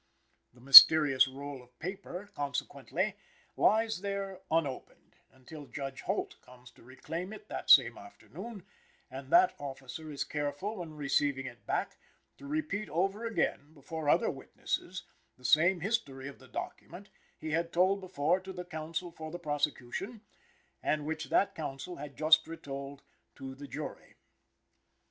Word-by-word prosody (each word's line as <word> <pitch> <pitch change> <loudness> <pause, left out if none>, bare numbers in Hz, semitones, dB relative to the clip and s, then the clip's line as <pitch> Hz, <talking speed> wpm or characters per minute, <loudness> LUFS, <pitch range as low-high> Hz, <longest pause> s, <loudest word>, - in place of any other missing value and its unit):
The 125 - -19
mysterious 135 0 +10
roll 140 0 -8
of 125 0 -22
paper, 185 +2 -7
consequently, 145 -5 -3 0.4
lies 220 -2 +2
there 195 -1 -4
unopened, 155 -5 -3
until 140 +3 -12
Judge 135 +1 -6
Holt - - -3
comes 125 0 -16
to - - -22
reclaim 155 - -7
it 410 - -12
that - - -6
same - - +7
afternoon; 220 -6 -11 0.5
and - - -9
that 360 +2 +5
officer 135 +2 -8
is 140 -2 -3
careful, 150 +9 -4
when 165 -4 -7
receiving 140 -1 0
it 120 -2 -11
back, - - -2 0.4
to 280 - -10
repeat 290 -9 -3
over 195 +7 -1
again, 155 -8 -2
before 150 +1 -5
other - - +3
witnesses, - - -5 0.3
the 125 - -17
same 170 +7 +4
history 150 - -2
of 140 - -10
the 130 - -16
document, 180 - -8 0.3
he 155 - -6
had 165 +2 -1
told 190 +3 +2
before 180 -1 0
to 190 0 -9
the 180 -1 -7
counsel 165 +1 -5
for 160 -1 -8
the 175 - -6
prosecution, 150 - -3 0.6
and 150 -1 -1
which 160 +1 -3
that 200 - +2
counsel 155 +3 -6
had 140 0 -9
just 155 0 +4
retold 140 -3 -8 0.3
to 135 -1 -8
the 140 +2 -10
jury. 140 +4 -8
155 Hz, 145 wpm, -31 LUFS, 140-185 Hz, 0.6 s, mysterious